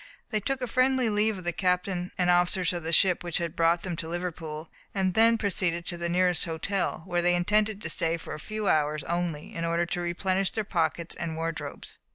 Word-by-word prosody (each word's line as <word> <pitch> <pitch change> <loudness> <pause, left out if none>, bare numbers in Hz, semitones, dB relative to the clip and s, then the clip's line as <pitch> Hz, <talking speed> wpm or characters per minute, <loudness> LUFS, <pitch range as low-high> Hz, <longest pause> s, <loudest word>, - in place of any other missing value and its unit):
They 215 - +1
took 270 +5 -2
a - - -1
friendly 255 -1 +2
leave 210 0 +1
of 185 - -8
the 175 - 0
captain 180 0 0
and 180 -1 +3
officers 180 +1 +3
of 175 - -3
the 165 0 -3
ship 180 +1 +4
which 175 -2 -1
had 170 -2 -3
brought 170 +1 +3
them 180 -3 -3
to 165 - -4
Liverpool, 165 -3 -5 0.2
and 190 -2 +1
then 230 +2 +5
proceeded 180 -5 -1
to 175 - -4
the 170 0 -2
nearest 180 -1 +3
hotel, 170 +2 -2
where 175 -2 0
they 175 0 +3
intended 210 +3 +1
to - - -3
stay 165 0 0
for - - -8
a 155 - -6
few 215 +4 -4
hours 150 -1 +2
only, 170 -2 -3
in 165 - -3
order 170 +1 +1
to 175 +1 -3
replenish 185 +2 0
their 220 - -2
pockets 165 -3 -1
and 165 -2 -4
wardrobes. 165 -1 -5
175 Hz, 215 wpm, -28 LUFS, 165-195 Hz, 0.2 s, then